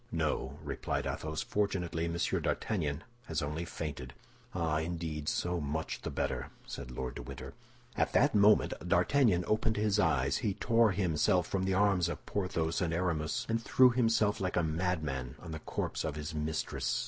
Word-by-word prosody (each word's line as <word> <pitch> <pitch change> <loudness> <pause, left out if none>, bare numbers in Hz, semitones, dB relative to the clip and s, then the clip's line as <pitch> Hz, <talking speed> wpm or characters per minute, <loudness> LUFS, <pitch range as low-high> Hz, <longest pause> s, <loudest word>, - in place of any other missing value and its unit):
"No," 65 +2 -1
replied - - -2
Athos, 80 0 -3
"fortunately 90 -5 -1
Monsieur 85 +1 0
d'Artagnan 80 -8 -1 0.2
has 80 -1 -1
only 75 +4 -3
fainted." 70 -5 -6 0.4
"Ah, 80 -3 +1
indeed, 80 -2 -3
so 90 0 -1
much 75 +2 -3
the - - -4
better!" - - -2 0.2
said - - -7
Lord 65 0 -4
de - - -7
Winter. 65 +2 -8 0.4
At - - +1
that - - +4
moment 105 +1 +5
D'Artagnan 90 - +3
opened 110 0 +1
his 105 -1 +2
eyes. 70 -8 +2
He 105 -6 -1
tore 115 -1 +4
himself 90 -1 +2
from 95 0 -1
the 95 -1 +1
arms 95 -4 +3
of 85 - -6
Porthos 85 -5 -1
and 85 -2 0
Aramis, 85 -3 -1
and 115 0 0
threw 130 +2 +5
himself 115 -4 +2
like 90 -1 -1
a 85 - +2
madman 80 -6 -1
on 80 - -9
the 80 - -4
corpse - - -3
of 80 -3 -2
his 75 +1 -5
mistress. 75 0 -1
85 Hz, 170 wpm, -32 LUFS, 75-100 Hz, 0.4 s, moment